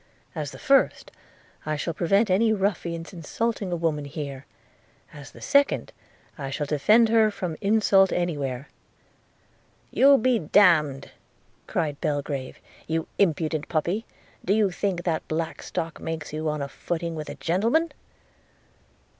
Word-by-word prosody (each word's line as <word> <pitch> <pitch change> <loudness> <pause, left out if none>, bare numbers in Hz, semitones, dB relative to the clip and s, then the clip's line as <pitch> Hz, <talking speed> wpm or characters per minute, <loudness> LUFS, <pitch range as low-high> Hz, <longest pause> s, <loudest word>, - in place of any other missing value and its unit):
As 150 -2 -4
the 135 - -11
first, 275 - +2 0.5
I 155 0 -2
shall 165 +3 -3
prevent 195 +5 +2
any 220 +4 +3
ruffian's 180 -4 -2
insulting 200 +4 -3
a - - 0
woman 160 -3 -1
here; 140 -2 -6 0.7
as 145 -2 -10
the - - -15
second, 280 0 +2 0.5
I 135 -1 -4
shall 145 +2 -2
defend 210 +11 +4
her 220 -1 +4
from 180 -5 -4
insult 200 -2 +4
any 175 -2 0
where.' 135 -1 -4 0.6
– - - -37
'You 275 +1 +6
be 245 0 +2
d 155 - -10 0.3
– 140 -2 -7
d!' - - -13 0.6
cried 150 -3 -2
Belgrave; 145 -4 -3 0.3
'you 160 0 -1
impudent 160 -4 +1
puppy, 175 +8 -1 0.4
do 195 - +2
you 210 -3 +2
think 180 -2 -2
that 165 -3 -2
black 160 +1 -3
stock 165 0 -4
makes 160 -2 -5
you 155 0 -2
on 150 -1 -2
a - - -3
footing 170 +3 -4
with 155 -2 -6
a - - -6
gentleman?' 230 - +1
165 Hz, 150 wpm, -25 LUFS, 150-200 Hz, 0.7 s, You